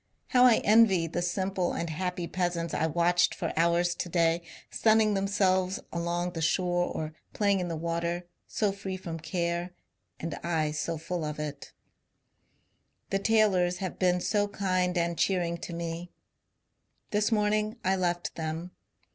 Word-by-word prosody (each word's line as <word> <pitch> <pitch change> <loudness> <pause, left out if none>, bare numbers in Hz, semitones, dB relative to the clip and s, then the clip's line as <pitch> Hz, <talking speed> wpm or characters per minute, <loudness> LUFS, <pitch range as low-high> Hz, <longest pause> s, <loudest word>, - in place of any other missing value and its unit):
How 250 0 +6
I 240 -3 +6
envy 210 -5 +5
the 165 +2 -3
simple 185 +1 -1
and 170 -1 -3
happy 180 +2 -2
peasants 175 -2 -2
I 160 - +1
watched 175 +2 +2
for 165 - -3
hours 170 +1 +2
to 175 - -4
day 170 0 +2 0.3
sunning 220 -1 +4
themselves 190 -1 +1
alone 175 +1 -1
the 165 - -4
shore 175 +2 +1
or 155 -2 -4 0.2
phmng 200 -2 +2
in 180 - -2
the 165 - -3
water, 170 +2 -2 0.2
so 210 -2 0
free 195 -1 -5
from 165 -3 -6
care, 170 +1 -2 0.4
and 165 -1 -4
I 160 -2 0
so 155 +2 -2
full 165 +2 -4
of 150 0 -4
it!.. 150 -1 -6 1.4
• - - -44
The 195 - +1
Taylors 195 -5 +3
have 185 0 -5
been 180 -1 +3
so 205 +1 +1
kind 185 -3 0
and 170 0 0
cheering 175 -3 +1
to - - -7
me. 170 +1 -5 1.0
This 210 +2 +1
morning 215 +1 +1
I 190 +1 +3
left 175 -2 -1
them. 160 +2 -4
175 Hz, 155 wpm, -29 LUFS, 170-195 Hz, 1.4 s, How